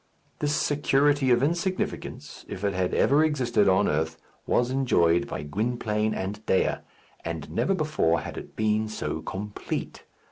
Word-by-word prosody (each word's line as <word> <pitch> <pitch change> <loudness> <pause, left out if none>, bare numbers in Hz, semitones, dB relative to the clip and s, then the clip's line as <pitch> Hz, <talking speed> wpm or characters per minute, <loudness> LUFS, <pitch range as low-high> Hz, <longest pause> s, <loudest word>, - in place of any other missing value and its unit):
This 150 0 0
security 145 -1 +2
of 120 +1 +4
insignificance, 175 +5 -2
if 95 - -6
it 100 -1 +1
had 90 -1 0
ever 145 +3 +4
existed 120 -9 +2
on 95 +2 +3
earth, 80 +2 -1 0.3
was 125 +1 +2
enjoyed 85 -11 +2
by - - -5
Gwynplaine 110 +5 -1
and 100 +3 -4
Dea, 95 - +2 0.5
and 80 -3 -5
never 195 - +1
before 155 - +1
had - - -7
it - - -9
been 110 0 +1
so 110 - -4
complete. 105 +2 -5
110 Hz, 145 wpm, -26 LUFS, 95-140 Hz, 0.5 s, of